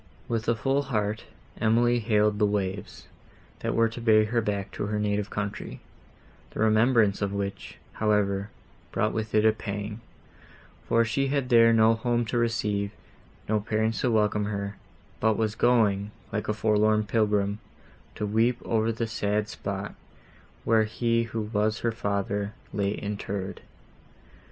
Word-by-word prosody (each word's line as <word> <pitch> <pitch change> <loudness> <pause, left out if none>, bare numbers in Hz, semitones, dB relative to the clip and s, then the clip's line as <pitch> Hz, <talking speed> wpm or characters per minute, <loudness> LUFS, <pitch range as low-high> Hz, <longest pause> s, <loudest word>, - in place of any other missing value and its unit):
With 115 -1 -1
a 120 - +3
full 135 +5 +1
heart, 110 -6 -2 0.3
Emily 120 +2 +3
hailed 105 -2 +2
the 105 - +4
waves, 100 -1 -3 0.5
that - - -2
were 115 0 +4
to 115 +2 -8
bear 110 -2 +5
her 115 +2 0
back 100 -2 -3
to 100 - -4
her 105 0 -1
native 105 0 -1
country, 100 0 -5 0.7
the - - -9
remembrance 110 -1 +3
of 100 -1 0
which, 100 -1 -4 0.2
however, 100 -2 +1 0.4
brought - - 0
with 110 0 -3
it 105 0 +4
a 110 - +7
pang; 105 0 -5 0.9
for 115 0 +3
she 135 +5 0
had 135 -2 -1
there 115 -2 +6
no 110 0 +5
home 120 +1 0
to 120 +2 -1
receive, 105 -4 0 0.6
no 110 0 +2
parents 110 +1 -1
to 125 - +2
welcome 105 -2 +2
her, 100 -1 -3 0.4
but 110 -1 +2
was 110 -2 0
going, 110 -4 +2 0.2
like 105 - -2
a 105 - +1
forlorn 110 0 +2
pilgrim, 105 -1 +1 0.6
to 105 - -2
weep 115 +4 +2
over 110 0 +1
the 115 +1 -2
sad 105 -2 -1
spot, 100 -1 -5 0.7
where 110 -1 +3
he, 115 +1 0
who 115 -1 -4
was 105 0 -1
her 115 - +1
father, 100 -1 -2 0.2
lay 100 -1 0
interred. 100 -2 -4
110 Hz, 150 wpm, -27 LUFS, 105-115 Hz, 0.9 s, a